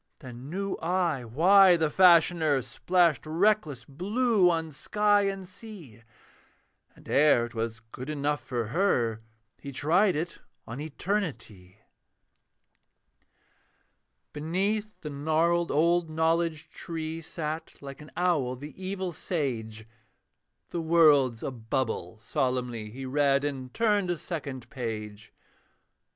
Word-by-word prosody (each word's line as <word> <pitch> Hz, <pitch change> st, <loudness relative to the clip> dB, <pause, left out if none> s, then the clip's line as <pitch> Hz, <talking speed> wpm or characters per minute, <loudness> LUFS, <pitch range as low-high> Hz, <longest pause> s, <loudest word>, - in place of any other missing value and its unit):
Then 130 Hz, -1 st, -10 dB
knew 195 Hz, +3 st, -3 dB
I 170 Hz, -6 st, -1 dB
why 180 Hz, -, +6 dB
the 160 Hz, -2 st, 0 dB
Fashioner 170 Hz, -6 st, +4 dB
Splashed 165 Hz, +4 st, +1 dB
reckless 160 Hz, -, +1 dB
blue 200 Hz, -, +2 dB
on 165 Hz, -2 st, -1 dB
sky 205 Hz, +6 st, +2 dB
and 195 Hz, -1 st, -4 dB
sea; 185 Hz, -, -12 dB, 0.9 s
And -, -, -18 dB
ere 140 Hz, -5 st, +4 dB
'twas 115 Hz, -1 st, -4 dB
good 130 Hz, +3 st, -7 dB
enough 145 Hz, -2 st, -1 dB
for 120 Hz, -3 st, -3 dB
her, 120 Hz, -, +1 dB, 0.4 s
He 140 Hz, -, -8 dB
tried 175 Hz, +8 st, +2 dB
it 165 Hz, +3 st, -4 dB, 0.3 s
on 115 Hz, +4 st, -7 dB
Eternity. 150 Hz, -, -4 dB, 2.6 s
Beneath 195 Hz, +8 st, -2 dB
the 150 Hz, -, -6 dB
gnarled 160 Hz, +4 st, +1 dB
old 170 Hz, +2 st, +2 dB
Knowledge 160 Hz, 0 st, 0 dB
tree 160 Hz, -1 st, -5 dB
Sat, 160 Hz, 0 st, -5 dB
like 140 Hz, 0 st, -9 dB
an 150 Hz, -, -12 dB
owl, 160 Hz, -8 st, +1 dB
the 145 Hz, +4 st, -9 dB
evil 190 Hz, -1 st, -3 dB
sage: 115 Hz, -, -4 dB, 0.8 s
'The 170 Hz, -, -2 dB
World's 150 Hz, -8 st, +4 dB
a -, -, -2 dB
bubble,' 115 Hz, -5 st, -3 dB
solemnly 120 Hz, -1 st, -2 dB
He 130 Hz, +5 st, -8 dB
read, 140 Hz, +1 st, +2 dB
and 135 Hz, -3 st, -4 dB
turned 210 Hz, -, +1 dB
a 175 Hz, -, 0 dB
second 140 Hz, -8 st, -6 dB
page. 110 Hz, -4 st, -6 dB
155 Hz, 115 wpm, -28 LUFS, 130-175 Hz, 2.6 s, why